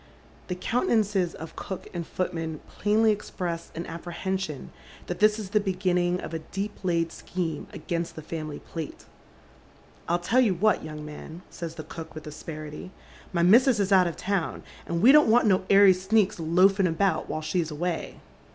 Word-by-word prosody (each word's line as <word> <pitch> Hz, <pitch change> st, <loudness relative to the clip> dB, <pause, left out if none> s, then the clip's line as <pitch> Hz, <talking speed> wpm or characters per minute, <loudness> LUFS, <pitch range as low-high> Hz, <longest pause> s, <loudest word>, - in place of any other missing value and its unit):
The 180 Hz, -, -2 dB
countenances 205 Hz, -, +1 dB
of 160 Hz, -, -9 dB
cook 190 Hz, -, -6 dB
and 170 Hz, -2 st, -4 dB
footman 165 Hz, -4 st, -3 dB
plainly 215 Hz, +1 st, +2 dB
express 175 Hz, -5 st, -4 dB
au 170 Hz, -, -3 dB
apprehension 170 Hz, -1 st, -4 dB, 0.3 s
that 180 Hz, -, -5 dB
this 210 Hz, 0 st, +5 dB
is 205 Hz, -3 st, -6 dB
the 210 Hz, -, +4 dB
beginning 180 Hz, -2 st, 0 dB
of -, -, -7 dB
a 165 Hz, -, -2 dB
deep 195 Hz, +6 st, -5 dB
laid 170 Hz, -2 st, +1 dB
scheme 165 Hz, -4 st, -4 dB
against 170 Hz, -1 st, -4 dB
the 155 Hz, -, -8 dB
family 155 Hz, -2 st, -5 dB
plate. 160 Hz, -3 st, -7 dB, 0.5 s
" -, -, -28 dB
I'll 170 Hz, -, +3 dB
teU 200 Hz, +9 st, +1 dB
you 230 Hz, -7 st, +4 dB
what, 210 Hz, +2 st, +2 dB
young 155 Hz, -1 st, -7 dB
man," 160 Hz, +3 st, -9 dB
says 170 Hz, -2 st, -6 dB
the 155 Hz, -, -6 dB
cook, 160 Hz, 0 st, -9 dB
with 155 Hz, -, -7 dB
aspeiity, 150 Hz, +1 st, -7 dB, 0.2 s
" -, -, -21 dB
my 170 Hz, -2 st, +1 dB
missus 235 Hz, +5 st, +6 dB
is 200 Hz, 0 st, 0 dB
out 185 Hz, -2 st, +6 dB
of 170 Hz, -, -4 dB
town, 195 Hz, -4 st, -2 dB, 0.2 s
and 170 Hz, +2 st, -1 dB
we 255 Hz, -, +9 dB
don't 300 Hz, -4 st, +6 dB
want 235 Hz, +2 st, +5 dB
no 190 Hz, -3 st, +3 dB
airy 200 Hz, -1 st, +8 dB
sneaks 190 Hz, +1 st, +1 dB
loafing 185 Hz, +4 st, +4 dB
about 180 Hz, +4 st, 0 dB
while 155 Hz, -, -2 dB
she's 165 Hz, +1 st, -1 dB
away." 165 Hz, +2 st, -3 dB
180 Hz, 180 wpm, -27 LUFS, 165-200 Hz, 0.5 s, we